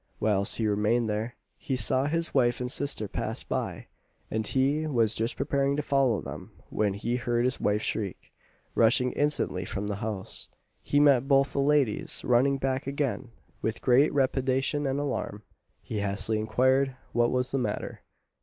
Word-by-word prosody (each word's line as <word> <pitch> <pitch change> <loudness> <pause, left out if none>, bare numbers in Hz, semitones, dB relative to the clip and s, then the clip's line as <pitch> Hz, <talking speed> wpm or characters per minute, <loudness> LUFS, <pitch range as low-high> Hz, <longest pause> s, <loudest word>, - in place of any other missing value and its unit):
Whilst 100 -2 +4
he 115 - -1
remained 105 +3 +1
there, 110 +3 -3 0.2
he 135 - -2
saw 130 +2 +2
his 165 +2 -1
wife 120 -3 +2
and 125 0 -3
sister 140 -7 +2
pass - - -4
by, - - -4 0.5
and 110 -1 -1
he 140 +4 +1
was 115 -7 +1
just 115 +2 -1
preparing 140 0 0
to 150 - -2
follow 135 -6 +1
them - - -9 0.2
when 105 -2 0
he 120 +4 -2
heard 120 -1 0
his 130 0 -1
wife 105 +1 +1
shriek. 100 -5 -4 0.4
Rushing 120 +2 +3
instantly 145 -10 -1
from 95 +2 -4
the 105 -1 -3
house, 105 -2 -4 0.3
he 145 - +1
met 140 -3 +4
both 135 -1 +3
the - - -1
ladies 140 -6 +1
running 130 +3 +3
back 130 0 -2
again 140 -2 -2 0.3
with 110 - -3
great 130 +4 +5
trepidation 135 +1 0
and 135 +1 -1
alarm. 130 -7 -3 0.4
He 110 - -4
hastily 100 +2 -1
inquired 130 +5 +1 0.2
what 120 0 +2
was 125 0 -1
the 135 - 0
matter. 125 - -4
125 Hz, 165 wpm, -27 LUFS, 110-135 Hz, 0.5 s, great